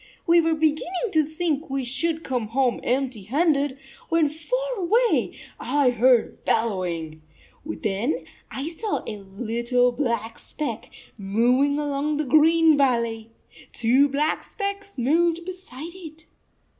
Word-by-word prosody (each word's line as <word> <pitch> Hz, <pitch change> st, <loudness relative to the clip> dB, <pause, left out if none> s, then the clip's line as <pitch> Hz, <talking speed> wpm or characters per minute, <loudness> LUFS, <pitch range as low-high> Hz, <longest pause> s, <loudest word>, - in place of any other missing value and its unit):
We 340 Hz, -2 st, +5 dB
were 325 Hz, 0 st, +1 dB
beginning 320 Hz, +7 st, 0 dB
to 315 Hz, -, +4 dB
think 315 Hz, 0 st, -2 dB
we 270 Hz, 0 st, -2 dB
should 320 Hz, +6 st, -1 dB
come 245 Hz, -4 st, -2 dB
home 250 Hz, +2 st, +1 dB
empty 255 Hz, -3 st, -1 dB
handed, 280 Hz, -, +1 dB, 0.3 s
when 330 Hz, -3 st, +3 dB
far 330 Hz, +12 st, -3 dB, 0.2 s
away 440 Hz, +6 st, +1 dB, 0.2 s
I 285 Hz, -3 st, +2 dB
heard 245 Hz, 0 st, +2 dB
bellowing. 175 Hz, -8 st, -1 dB, 0.4 s
Then 200 Hz, -, -2 dB, 0.2 s
I 275 Hz, +4 st, -4 dB
saw 410 Hz, +6 st, -3 dB
a 210 Hz, -, -5 dB
little 235 Hz, +5 st, 0 dB
black 235 Hz, -4 st, -2 dB
speck 235 Hz, -7 st, -5 dB, 0.3 s
moving 245 Hz, +8 st, +2 dB
along 290 Hz, 0 st, -1 dB
the 305 Hz, -, 0 dB
green 315 Hz, +3 st, +5 dB
36 -, -, -2 dB
valley. 235 Hz, -4 st, 0 dB, 0.4 s
Two 255 Hz, +5 st, +3 dB
black 295 Hz, +3 st, 0 dB
specks 400 Hz, -2 st, -5 dB
moved 335 Hz, +6 st, +1 dB
beside 345 Hz, -4 st, -8 dB
it. 320 Hz, -4 st, -11 dB
280 Hz, 130 wpm, -24 LUFS, 235-325 Hz, 0.4 s, We